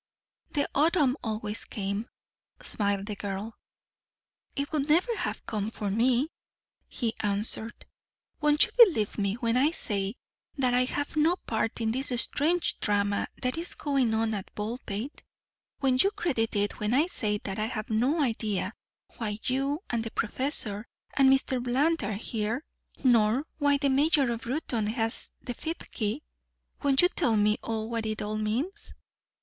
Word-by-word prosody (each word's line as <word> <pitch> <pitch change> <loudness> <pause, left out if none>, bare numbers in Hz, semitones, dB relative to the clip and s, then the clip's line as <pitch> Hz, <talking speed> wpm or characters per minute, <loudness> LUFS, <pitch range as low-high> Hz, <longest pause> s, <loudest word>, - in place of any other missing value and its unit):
"The 285 -2 +1
autumn 295 -3 +3
always 215 -1 -2
came," 200 +2 -3 0.5
smiled 200 -2 0
the 210 -1 -4
girl. 200 +2 -4 1.0
"It 280 0 -2
would 300 -1 0
never 365 +10 +3
have - - -3
come 210 -1 -2
for 210 -3 -3
me," 250 +7 +2 0.6
he 230 -3 -2
answered. 210 +2 -1 0.5
"Won't 300 -1 +5
you - - -11
believe 225 - +1
me 200 0 +1
when 235 0 0
I 275 +4 +4
say 205 -9 -2 0.4
that 255 -2 +2
I 250 +1 +4
have 285 +3 -3
no 315 +3 +4
part 225 - -2
in 220 -1 +1
this 265 +3 -1
strange 325 +8 +2
drama 205 -1 +1 0.2
that 255 +5 0
is 345 - -3
going 270 -6 +1
on 220 0 +1
at 200 -3 -5
Baldpate? 220 +3 -4 0.6
Won't 260 -2 +4
you 395 - +4
credit 265 - -1
it 205 0 0
when 210 +3 +1
I 295 +4 +4
say 210 -12 -1
that 195 0 -4
I 215 - +1
have 215 -1 -5
no 265 +8 +2
idea 215 -5 -1 0.4
why 210 -3 -2
you 275 +6 0
and 235 -2 0
the 225 - -4
professor 220 -3 -1 0.3
and 270 -1 +5
Mr. 265 -1 +2
Bland 270 +5 +1
are 205 +1 -1
here 225 +4 -2 0.4
nor 240 +1 +4
why 285 -1 +4
the 280 0 +1
Mayor 280 -1 +3
of 235 0 -5
Reuton 245 -5 -1
has 225 0 +1
the 245 - -4
fifth 325 +7 -6
key? 225 +6 -2 0.6
Won't 280 +1 +4
you 355 - +6
tell 240 -13 +2
me 210 +1 +3
what 225 0 -2
it 215 -1 -2
all 215 +1 -2
means?" 275 - -2
235 Hz, 160 wpm, -28 LUFS, 215-280 Hz, 1.0 s, you